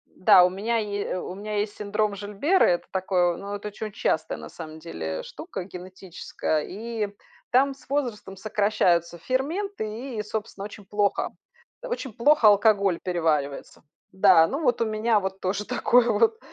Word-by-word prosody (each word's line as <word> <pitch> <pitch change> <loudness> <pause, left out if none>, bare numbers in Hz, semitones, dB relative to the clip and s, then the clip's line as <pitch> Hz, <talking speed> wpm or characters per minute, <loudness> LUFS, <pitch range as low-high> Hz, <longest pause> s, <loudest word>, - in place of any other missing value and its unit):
Да, 185 -1 +7
у - - +2
меня 220 +5 -1
е 205 -2 -2
э, 185 - -2
у 180 - -6
меня 210 +1 -4
есть 205 0 -2
синдром 210 0 -1
Жильбера, 210 - +2
это 175 -1 +1
такое, 180 -2 +1
ну, 200 +1 -6
это 205 +1 -6
оче 210 +1 -7
очень 210 - -7
частая, 160 -7 -1
на - - -8
самом 160 -2 -9
деле, 80 - -5
штука 315 - -7
генетическая. 180 -4 -4
И 220 +1 -4 0.4
там 275 +2 +4
с 270 - -21
возрастом 240 -9 -2
сокращаются 185 -5 +1
ферменты, 290 - -2
и 235 +2 -6
и, - - -1
собственно, 210 -1 -5
очень 210 -1 -10
плохо, 205 +1 0 0.5
очень 475 - -4
плохо 235 +1 +4
алкоголь 200 -3 +4
переваривается. 160 -6 -1 0.3
Да, 190 -4 +6
ну 280 - -3
вот 245 -4 +2
у - - +3
меня 215 0 +1
вот 190 0 -4
тоже 195 +3 -2
такое 245 -1 +3
вот. 450 0 +2
205 Hz, 165 wpm, -25 LUFS, 185-230 Hz, 0.5 s, Да